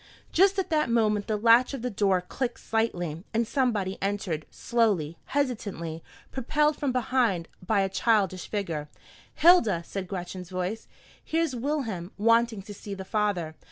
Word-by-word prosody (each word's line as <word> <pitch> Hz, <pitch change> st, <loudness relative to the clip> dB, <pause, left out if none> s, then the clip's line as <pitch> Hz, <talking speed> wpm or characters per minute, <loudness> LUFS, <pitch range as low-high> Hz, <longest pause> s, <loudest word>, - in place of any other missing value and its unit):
Just 385 Hz, +3 st, +4 dB
at 380 Hz, -3 st, -1 dB
that 305 Hz, -5 st, +2 dB
moment 215 Hz, -3 st, +2 dB
the 215 Hz, -, 0 dB
latch 235 Hz, +5 st, +5 dB
of 250 Hz, -, -7 dB
the 250 Hz, -, -1 dB
door 195 Hz, -3 st, +2 dB
clicked 240 Hz, +7 st, -4 dB
slightly, 175 Hz, -8 st, -2 dB
and 230 Hz, +1 st, +2 dB
somebody 220 Hz, -8 st, 0 dB
entered, 195 Hz, -6 st, -2 dB
slowly, 200 Hz, -10 st, 0 dB
hesitatingly, 200 Hz, -, -2 dB, 0.3 s
propelled 300 Hz, +4 st, +1 dB
from 285 Hz, -2 st, -1 dB
behind 240 Hz, -8 st, +1 dB, 0.2 s
by 200 Hz, +2 st, +2 dB
a 195 Hz, -, +1 dB
childish 195 Hz, -2 st, +1 dB
figure. 165 Hz, -8 st, -3 dB, 0.5 s
"Hilda," 295 Hz, -, +5 dB
said 190 Hz, 0 st, -5 dB
Gretchen's 180 Hz, -1 st, -6 dB
voice, 185 Hz, +4 st, -3 dB, 0.4 s
"here's 325 Hz, -4 st, 0 dB
Wilhelm 230 Hz, -, -2 dB
wanting 230 Hz, -1 st, +3 dB
to 205 Hz, -, -9 dB
see 200 Hz, 0 st, -7 dB
the 190 Hz, -1 st, -7 dB
father. 195 Hz, -6 st, -1 dB
210 Hz, 150 wpm, -27 LUFS, 185-245 Hz, 0.5 s, latch